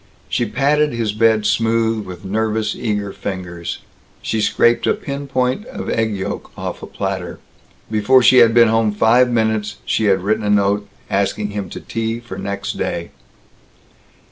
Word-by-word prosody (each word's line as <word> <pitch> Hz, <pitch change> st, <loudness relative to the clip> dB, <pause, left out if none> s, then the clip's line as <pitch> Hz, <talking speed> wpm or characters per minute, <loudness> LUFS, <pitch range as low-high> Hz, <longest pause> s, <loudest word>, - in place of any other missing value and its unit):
She 115 Hz, +10 st, -1 dB
patted 145 Hz, +5 st, +1 dB
his 115 Hz, -3 st, -1 dB
bed 110 Hz, -1 st, +3 dB
smooth 115 Hz, -2 st, +1 dB
with 90 Hz, +2 st, -9 dB
nervous 110 Hz, +2 st, -1 dB
eager 105 Hz, -4 st, -2 dB
fingers. 90 Hz, -3 st, -6 dB, 0.4 s
She 110 Hz, -, -1 dB
scraped 120 Hz, +2 st, +2 dB
a -, -, +3 dB
pin 140 Hz, 0 st, -6 dB
point 130 Hz, -, -1 dB
of 260 Hz, -, -5 dB
egg 110 Hz, -2 st, 0 dB
yolk 95 Hz, -, -5 dB
off -, -, -5 dB
a -, -, -7 dB
platter. 95 Hz, -3 st, -4 dB, 0.5 s
Before 120 Hz, +4 st, +4 dB
she 130 Hz, -, +6 dB
had 115 Hz, -1 st, +7 dB
been 115 Hz, 0 st, +6 dB
home 110 Hz, -1 st, +2 dB
five 120 Hz, +4 st, +4 dB
minutes 110 Hz, -3 st, 0 dB
she 110 Hz, -, 0 dB
had 95 Hz, -2 st, +2 dB
written 110 Hz, +2 st, 0 dB
a 105 Hz, -, -1 dB
note 100 Hz, 0 st, +2 dB, 0.2 s
asking 100 Hz, +1 st, 0 dB
him 100 Hz, -3 st, -4 dB
to -, -, -7 dB
tea 115 Hz, 0 st, -3 dB
for 120 Hz, -5 st, -9 dB
next 100 Hz, 0 st, -4 dB
day. 85 Hz, 0 st, -3 dB
110 Hz, 165 wpm, -19 LUFS, 100-115 Hz, 0.5 s, had